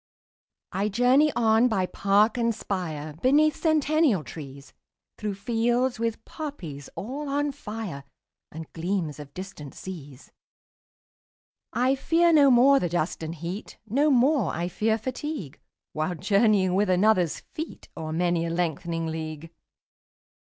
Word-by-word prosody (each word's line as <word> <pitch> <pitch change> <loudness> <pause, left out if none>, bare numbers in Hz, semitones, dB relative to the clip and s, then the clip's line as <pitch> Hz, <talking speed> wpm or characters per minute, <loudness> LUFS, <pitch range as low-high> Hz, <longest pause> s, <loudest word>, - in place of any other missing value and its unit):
20 195 +2 -1
I - - 0
journey 255 +7 +4
on 225 +1 +4
by 195 -6 +1
park 200 +4 +2
and 235 -2 +1
spire, 155 -8 -4
Beneath 300 +4 +4
centennial 310 - +2
trees, 140 -3 -10 0.5
Through 210 -2 -3
fields 235 +4 0
with 230 -1 -2
poppies 170 - -7
all 275 +7 -5
on 290 +1 0
fire, 210 - -6 0.5
And 160 0 -9
gleams 165 -3 -2
of 145 -1 -10
distant 185 -7 -8
seas. 145 -8 -10 1.4
I 255 +3 +2
fear 335 +5 +3
no 285 -3 +7
more 265 +3 +6
the 175 - -1
dust 170 -1 -1
and 160 +1 -5
heat, 175 +6 -6
25 220 - -19
No 285 +5 +3
more 260 - +3
I 170 +2 -2
fear 220 +4 +1
fatigue, 255 - -5 0.3
While 155 +3 -1
journeying 200 +1 +3
with 200 +1 +2
another's 185 -2 +3
feet 315 +1 -7
O'er 160 -1 -5
many 170 0 0
a - - -3
lengthening 165 -1 -2
league. 160 0 -5
200 Hz, 135 wpm, -26 LUFS, 165-250 Hz, 1.4 s, no